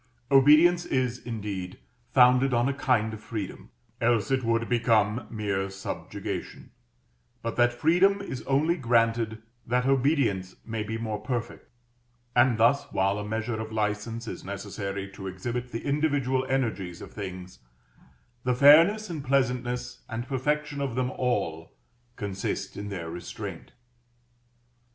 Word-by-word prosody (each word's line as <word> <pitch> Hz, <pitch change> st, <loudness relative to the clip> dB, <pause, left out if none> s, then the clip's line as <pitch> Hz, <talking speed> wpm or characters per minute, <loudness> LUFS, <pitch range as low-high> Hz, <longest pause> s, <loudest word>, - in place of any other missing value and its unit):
Obedience 155 Hz, +6 st, +6 dB
is, 130 Hz, -5 st, -1 dB
indeed, 100 Hz, -6 st, -5 dB, 0.3 s
founded 125 Hz, 0 st, +5 dB
on 120 Hz, +2 st, +2 dB
a 140 Hz, -, +1 dB
kind 115 Hz, -5 st, +1 dB
of 110 Hz, -, -8 dB
freedom, 105 Hz, -5 st, -6 dB, 0.3 s
else 115 Hz, -1 st, +2 dB
its 130 Hz, -1 st, +1 dB
would 115 Hz, 0 st, +1 dB
become 115 Hz, -2 st, +2 dB
mere 100 Hz, -3 st, -2 dB
subjugation, 95 Hz, 0 st, -6 dB, 0.7 s
but 115 Hz, -, -3 dB
that 120 Hz, 0 st, +4 dB
freedom 175 Hz, +10 st, +3 dB
is 130 Hz, -, -5 dB
only 150 Hz, +5 st, +2 dB
granted 115 Hz, -3 st, +1 dB, 0.2 s
that 125 Hz, +1 st, +1 dB
obedience 130 Hz, -, +1 dB
may 110 Hz, -1 st, -3 dB
be 110 Hz, +1 st, -3 dB
more 110 Hz, -2 st, -3 dB
perfect; 120 Hz, +1 st, -4 dB, 0.7 s
and 120 Hz, -1 st, +4 dB
thus, 140 Hz, +5 st, +4 dB
while 100 Hz, +2 st, +1 dB
a -, -, -4 dB
measure 110 Hz, +1 st, -3 dB
of 110 Hz, 0 st, -6 dB
license 110 Hz, +2 st, -2 dB
is -, -, -6 dB
necessary 100 Hz, 0 st, -5 dB
to 95 Hz, 0 st, -8 dB
exhibit 120 Hz, +7 st, -4 dB
the 115 Hz, -, -5 dB
individual 140 Hz, -3 st, +1 dB
energies 110 Hz, -10 st, -1 dB
of -, -, -10 dB
things, 95 Hz, -3 st, -7 dB, 0.8 s
the 125 Hz, -1 st, +1 dB
fairness 165 Hz, -, +7 dB
and 160 Hz, -6 st, -5 dB
pleasantness 125 Hz, -2 st, -1 dB
and 120 Hz, +3 st, -4 dB
perfection 145 Hz, +2 st, -1 dB
of 135 Hz, -4 st, -2 dB
them 130 Hz, 0 st, 0 dB
all 95 Hz, -12 st, -2 dB, 0.4 s
consist 100 Hz, -1 st, -4 dB
in 100 Hz, 0 st, -5 dB
their 90 Hz, -4 st, -5 dB
Restraint. 85 Hz, +1 st, -7 dB
120 Hz, 135 wpm, -27 LUFS, 105-130 Hz, 0.8 s, fairness